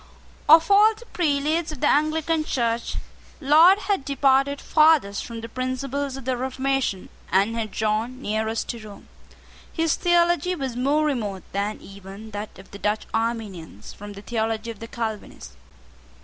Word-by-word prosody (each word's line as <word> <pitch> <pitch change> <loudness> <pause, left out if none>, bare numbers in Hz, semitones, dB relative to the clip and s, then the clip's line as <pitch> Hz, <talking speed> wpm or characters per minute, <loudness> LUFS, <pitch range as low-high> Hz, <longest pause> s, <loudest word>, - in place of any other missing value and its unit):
Of 325 +4 +7
all 425 +2 +6
the 470 +2 -14
prelates 310 -2 0
of 305 - -8
the - - +2
Anglican 310 +2 +1
Church, 235 -5 -1 0.4
Laud 315 +6 +6
had 390 -8 -1
departed 275 0 +2
farthest 305 -11 +3
from 230 -1 -7
the 230 - -6
principles 260 +3 -3
of 270 - -10
the 260 -1 0
Reformation, 260 -4 -2 0.2
and 200 +4 +2
had 225 -2 -2
drawn 220 +5 -1
nearest 220 -2 -2
to 235 - -4
Rome. 205 -2 -12 0.6
His 325 -1 +1
theology 345 0 +2
was 265 -6 -4
more 285 +5 +1
remote 215 -10 -2
than 200 +2 -2
even 200 +2 -11
that 205 +1 -7
of 190 - -15
the 200 - -10
Dutch 210 +2 -1
Arminians 215 - -4
from 205 0 -9
the 200 0 -11
theology 225 0 -2
of 220 - -12
the 230 - -7
Calvinists. 215 - -6
250 Hz, 155 wpm, -24 LUFS, 215-300 Hz, 0.6 s, Of